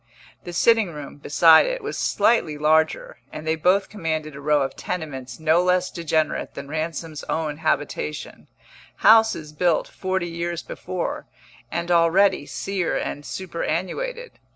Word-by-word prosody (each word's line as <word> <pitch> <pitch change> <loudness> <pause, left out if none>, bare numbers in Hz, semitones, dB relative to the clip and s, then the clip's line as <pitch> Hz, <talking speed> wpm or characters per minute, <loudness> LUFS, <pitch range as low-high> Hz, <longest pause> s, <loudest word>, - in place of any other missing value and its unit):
The 175 - -6
sitting 225 +3 +3
room, 150 -2 -9
beside 160 +3 +5
it, - - -3
was - - -4
slightly 165 -10 +1
larger, 155 +1 +1
and 155 - -8
they 160 0 +1
both 185 +5 +2
commanded 160 -6 -4
a 140 - -9
row 150 -1 +2
of 135 - -4
tenements 145 -8 -5
no 160 +2 +3
less 180 0 +1
degenerate 160 -2 -1
than 140 - -7
Ransom's 155 0 -4
own 155 -2 -2
habitation 145 - -3 0.6
houses 220 -9 +5
built 170 +1 +1
forty 190 -2 -2
years 170 0 -4
before, 185 -1 -5 0.4
and 170 +1 -2
already 170 -1 +3
sere 195 -3 -2
and 145 - -4
superannuated. 190 - -4
165 Hz, 135 wpm, -23 LUFS, 155-185 Hz, 0.6 s, beside